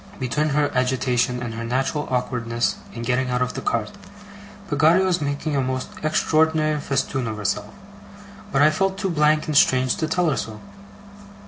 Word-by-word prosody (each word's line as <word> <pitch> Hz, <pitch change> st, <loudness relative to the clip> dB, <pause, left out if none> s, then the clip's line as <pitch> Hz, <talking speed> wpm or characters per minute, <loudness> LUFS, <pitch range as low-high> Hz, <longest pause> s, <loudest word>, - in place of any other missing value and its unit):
Between 150 Hz, +4 st, 0 dB
her 145 Hz, 0 st, +1 dB
agitation, 125 Hz, -1 st, 0 dB
and 115 Hz, -1 st, -4 dB
her 115 Hz, +1 st, -5 dB
natural 135 Hz, +5 st, -1 dB
awkwardness 120 Hz, -2 st, -1 dB, 0.2 s
in 115 Hz, -, -7 dB
getting 125 Hz, +2 st, 0 dB
out 125 Hz, 0 st, +1 dB
of 125 Hz, -, -3 dB
the -, -, -5 dB
cart, 110 Hz, -2 st, -1 dB, 0.8 s
Peggotty 160 Hz, +4 st, +4 dB
was 180 Hz, -3 st, +1 dB
making 145 Hz, +1 st, -2 dB
a 135 Hz, -, +2 dB
most 130 Hz, 0 st, -3 dB
extraordinary 155 Hz, 0 st, +2 dB
festoon 135 Hz, -2 st, -1 dB
of 110 Hz, -1 st, -4 dB
herself, 105 Hz, 0 st, -2 dB, 0.8 s
but 140 Hz, +1 st, +3 dB
I 155 Hz, -, +6 dB
felt 195 Hz, +4 st, 0 dB
too 195 Hz, -2 st, -1 dB
blank 150 Hz, -1 st, +2 dB
and 155 Hz, -, -3 dB
strange 130 Hz, -2 st, +4 dB
to 160 Hz, -, -1 dB
tell 170 Hz, 0 st, +1 dB
her 135 Hz, -, -1 dB
so. 110 Hz, -1 st, -5 dB
135 Hz, 175 wpm, -22 LUFS, 125-155 Hz, 0.8 s, I